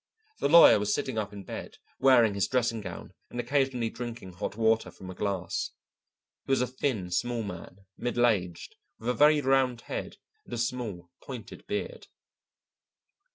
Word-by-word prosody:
The - - +1
lawyer 170 -8 +9
was 105 0 0
sitting 130 -2 -1
up 105 -1 -3
in 100 -1 -9
bed, - - -8 0.2
wearing 125 -5 +5
his 100 -2 0
dressing 120 -3 0
gown 100 - -8 0.2
and 120 - -6
occasionally 125 -2 0
drinking 120 -6 -7
hot 100 +2 -4
water 110 0 +2
from 95 -1 -10
a - - -7
glass. 95 -3 -2 0.8
He - - -2
was 135 - +4
a 125 - +2
thin, 125 -8 -2
small 120 +5 0
man, 95 0 -9
middle 120 0 +1
aged, 90 -7 -1 0.2
with 115 - -4
a - - +3
very 150 +2 +5
round 130 -3 +2
head - - -5 0.3
and - - -6
a - - -4
small 115 -8 -3
pointed 120 -6 -9
beard. - - -4
115 Hz, 165 wpm, -29 LUFS, 100-125 Hz, 0.8 s, lawyer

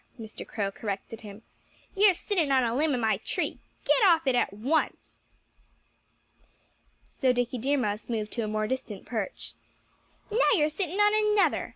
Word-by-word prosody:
Mr. 220 -1 -9
Crow 200 -3 -2
corrected 205 +2 -6
him. 210 0 -11 0.5
"You're 395 -1 +5
sitting 345 -6 -1
on 260 -1 +4
a 230 -1 0
limb 295 0 +2
of - - -2
my 220 -2 +1
tree.... - - -3 0.3
Get - - +3
off 335 -5 +5
it 265 - +2
at 245 - +1
once!" 260 +11 -2 1.9
So 260 -2 +1
Dickie 245 0 -1
Deer 280 +5 +1
Mouse 210 -4 -2
moved 215 -2 -2
to 235 - -2
a 215 - -2
more 215 0 -1
distant 235 -5 -5
perch. 220 -5 -5 0.8
"Now 460 +4 +3
you're 305 -4 +2
sitting 360 +4 -3
on 420 0 +3
another!" 400 - +2
250 Hz, 165 wpm, -27 LUFS, 220-325 Hz, 1.9 s, You're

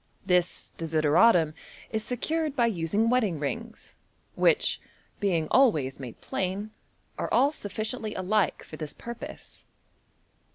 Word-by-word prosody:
This 180 -2 +1
desideratum 160 +2 +4 0.4
is 220 -1 -1
secured 305 +5 -1
by 240 -4 +3
using 205 +1 +1
wedding 230 -8 +2
rings, 225 +11 -5 0.4
which, - - +2 0.4
being 170 -6 +1
always 155 - +3
made 125 -4 -8
plain, 195 +3 -3 0.5
are - - -2
all 280 - +4
suf 205 -9 -8
ficiently 220 0 -3
alike 195 +2 +1
for 155 - -10
this 155 -2 -5
purpose. 235 0 -9
205 Hz, 120 wpm, -27 LUFS, 165-230 Hz, 0.5 s, desideratum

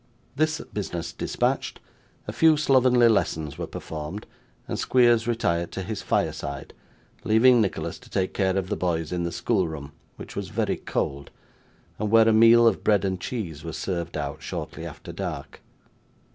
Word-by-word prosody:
This 155 +1 +1
business 90 -5 -4
dispatched, - - -1 0.5
a - - -2
few 160 -1 +5
slovenly 130 -4 +4
lessons 80 -8 0
were 85 - -3
performed, 80 +6 -6 0.4
and - - -3
Squeers 120 -2 +3
retired 85 -8 0
to 95 - -4
his 105 +2 -4
fireside, 70 0 -2 0.5
leaving 115 +2 +5
Nicholas 100 - -2
to - - -17
take 95 -1 -1
care 95 -1 +1
of 95 -1 -2
the - - 0
boys 80 -3 -1
in 90 -1 -1
the 85 - -2
school 95 -4 0
room, 75 -3 -7 0.2
which - - -10
was - - -4
very - - -1
cold, 70 0 -3 0.7
and 105 0 -1
where 115 +1 +6
a 115 - +5
meal 115 +1 +7
of 115 -4 +2
bread 105 -2 +3
and 95 -2 -2
cheese 85 - -5
was 80 -2 -5
served 85 -3 -3
out 70 -2 -4
shortly - - -6
after - - -9
dark. - - -6
95 Hz, 165 wpm, -25 LUFS, 85-115 Hz, 0.7 s, meal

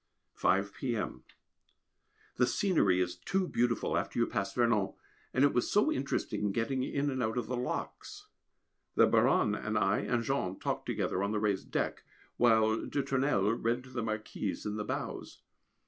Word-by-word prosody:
5 100 +2 +1
p.m. 120 -5 -3 1.1
The 125 - +4
scenery 155 - +2
is 90 0 -2
too 190 - -1
beautiful 120 -4 0
after - - -2
you 120 - +4
pass 100 -5 -2
Vernon, 115 -4 +2 0.4
and 130 - +2
it 145 - +4
was 125 - +1
so 210 +10 +3
interesting 105 - -1
getting 115 +5 -1
in 140 +2 -1
and 130 -1 -2
out 110 0 -1
of 120 - -1
the 125 - -3
locks. 410 - -5 0.7
The - - +7
Baronne - - +3
and - - -2
I - - +2
and 120 -1 0
Jean 105 -8 -1
talked - - -3
together 95 - -1
on 100 +1 0
the 105 - +1
raised 105 -2 -1
deck, - - -1 0.4
while 110 -2 +4
de 140 - -1
Tournelle 130 -8 +1
read 115 +2 -1
to 130 - -14
the 125 -2 -3
Marquise 110 -1 -3
in 105 0 -2
the 105 - -2
bows. - - -5
115 Hz, 170 wpm, -31 LUFS, 105-130 Hz, 1.1 s, The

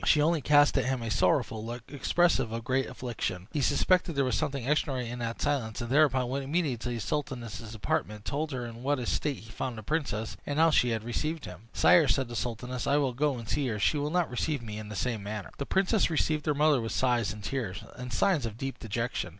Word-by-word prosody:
She 150 - +5
only 160 +1 +3
cast 145 0 +5
at - - 0
him 130 -2 -1
a 115 - -3
sorrowful 120 -6 +1
look, 120 +1 -6
expressive 140 -2 +2
of 115 0 -4
great 130 +2 +1
affliction. 105 -7 -4
He 150 - -1
suspected 180 +5 +2
there 140 -1 +2
was 130 - 0
something 135 +2 -2
extraordinary 135 -5 0
in 125 - -6
this 115 -1 -2
silence, 125 -6 -1
and 120 0 -4
thereupon 135 -3 +4
went 135 +2 -2
immediately 145 -2 0
to 125 - -4
the 120 -1 -3
sultaness's 120 -6 -4
apartment, 105 0 -2
told 150 +2 -2
her 125 -2 -3
in 115 0 -8
what 145 +3 +1
a 125 - -3
state 145 +1 -1
he 110 +1 -12
found 125 0 -4
the 110 - -7
princess, 115 -6 -2
and 145 - -3
how 165 +1 +5
she 125 -4 +4
had 110 -2 -1
received 155 +7 -2
him. 90 +5 -10
"Sire," 170 -4 +5
said 130 +1 +1
the 120 - -6
sultaness, 120 +3 -3
"I 140 - +4
will 135 -4 +1
go 140 +1 +1
and 115 -2 -8
see 140 +4 0
her; 110 -3 -1
she 145 +8 +2
will 145 +1 -1
not 175 -2 +1
receive 135 +1 -1
me 105 -1 -6
in 105 -1 -8
the 105 - -6
same 115 +1 -1
manner." 105 -1 -5
The 140 - -3
princess 195 +1 +2
received 155 -1 0
her 150 - +2
mother 150 -3 +4
with 115 - -3
sighs 120 -6 +2
and 105 +2 -9
tears, 110 -6 -3
and 125 0 -7
signs 150 - +2
of 110 -1 -8
deep 135 +2 -4
dejection. 115 -3 -2
125 Hz, 240 wpm, -29 LUFS, 115-145 Hz, -, She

